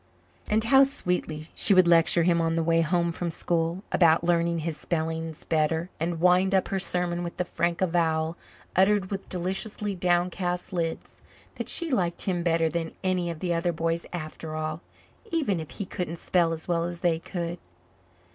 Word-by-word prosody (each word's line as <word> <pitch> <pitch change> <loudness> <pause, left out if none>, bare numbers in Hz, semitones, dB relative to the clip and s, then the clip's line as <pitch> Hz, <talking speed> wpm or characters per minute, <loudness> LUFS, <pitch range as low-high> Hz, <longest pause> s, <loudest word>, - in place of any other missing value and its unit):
And 215 +1 +2
how 270 +4 +6
sweetly 180 - -2
she 200 - +4
would 185 -1 +6
lecture 170 0 +4
him 170 0 +3
on 165 0 +1
the 165 - +1
way 165 0 +3
home 170 +1 +1
from 170 +1 -3
school 170 +2 -1
about 165 -2 +4
learning 170 0 +2
his 165 -2 -2
spellings 160 0 -3
better, 160 +2 0
and 165 +1 -2
wind 180 +2 +4
up 190 - +1
her 195 - 0
sermon 180 -1 -1
with 170 - -6
the 180 - 0
frank 170 0 -1
avowal, 165 -2 +1 0.4
uttered 190 0 +3
with 195 -1 -5
deliciously 195 +3 -2
downcast 180 0 0
lids, 165 -2 -3 0.4
that - - -4
she 335 -3 0
liked 175 -8 0
him 180 -3 -1
better 165 -1 +2
than 165 +1 -3
any 185 -2 0
of 165 -2 -6
the 175 -2 0
other 170 +1 0
boys 165 0 -2
after 155 -2 -6
all, 155 +1 -3 0.5
even 275 - 0
if 155 - -7
he 200 - -5
couldn't 180 -2 -4
spell 170 0 +1
as 160 -1 -5
well 170 -1 +1
as 175 0 -6
they 170 -2 +2
could. 170 0 -5
170 Hz, 180 wpm, -27 LUFS, 165-180 Hz, 0.5 s, how